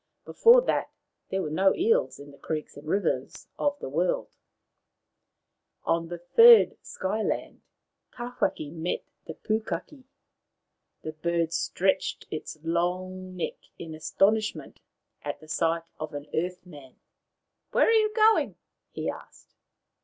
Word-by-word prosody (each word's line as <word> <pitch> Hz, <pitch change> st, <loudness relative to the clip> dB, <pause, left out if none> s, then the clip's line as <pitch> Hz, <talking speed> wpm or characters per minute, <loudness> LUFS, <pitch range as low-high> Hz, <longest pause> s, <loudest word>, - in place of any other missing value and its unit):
Before 480 Hz, +2 st, +6 dB
that -, -, 0 dB, 0.4 s
there 190 Hz, 0 st, -1 dB
were 150 Hz, -, -4 dB
no 190 Hz, +5 st, +3 dB
eels 455 Hz, +7 st, +2 dB
in 145 Hz, 0 st, -12 dB
the 140 Hz, -, -16 dB
creeks 155 Hz, -2 st, -4 dB
and 145 Hz, +2 st, -12 dB
rivers 160 Hz, -8 st, -1 dB
of 290 Hz, 0 st, +1 dB
the -, -, -6 dB
world. 170 Hz, +7 st, 0 dB, 1.5 s
On 165 Hz, 0 st, 0 dB
the 175 Hz, +1 st, -6 dB
third 460 Hz, -, +7 dB
Sky 200 Hz, +4 st, -3 dB
land -, -, -3 dB, 0.5 s
Tawhaki 240 Hz, -11 st, -3 dB
met 165 Hz, +1 st, -3 dB, 0.2 s
the -, -, -6 dB
Pukaki. 225 Hz, +5 st, -4 dB, 1.0 s
The 155 Hz, -, -4 dB
bird 170 Hz, +1 st, -1 dB
stretched 190 Hz, +1 st, 0 dB
its 155 Hz, 0 st, -6 dB
long 185 Hz, +2 st, -2 dB
neck 175 Hz, -, -3 dB, 0.2 s
in 160 Hz, -2 st, -8 dB
astonishment 210 Hz, +7 st, 0 dB, 0.4 s
at -, -, -5 dB
the 155 Hz, -, -15 dB
sight 165 Hz, +1 st, 0 dB, 0.2 s
of 155 Hz, -1 st, -6 dB
an 145 Hz, 0 st, -6 dB
earth 180 Hz, +3 st, -2 dB
man. 145 Hz, -7 st, -13 dB, 0.4 s
" -, -, -55 dB
Where -, -, +4 dB
are -, -, +3 dB
you 435 Hz, -1 st, +4 dB
going? 440 Hz, 0 st, +4 dB, 0.2 s
" -, -, -57 dB
he -, -, -4 dB
asked. -, -, -8 dB
180 Hz, 140 wpm, -27 LUFS, 160-220 Hz, 1.5 s, third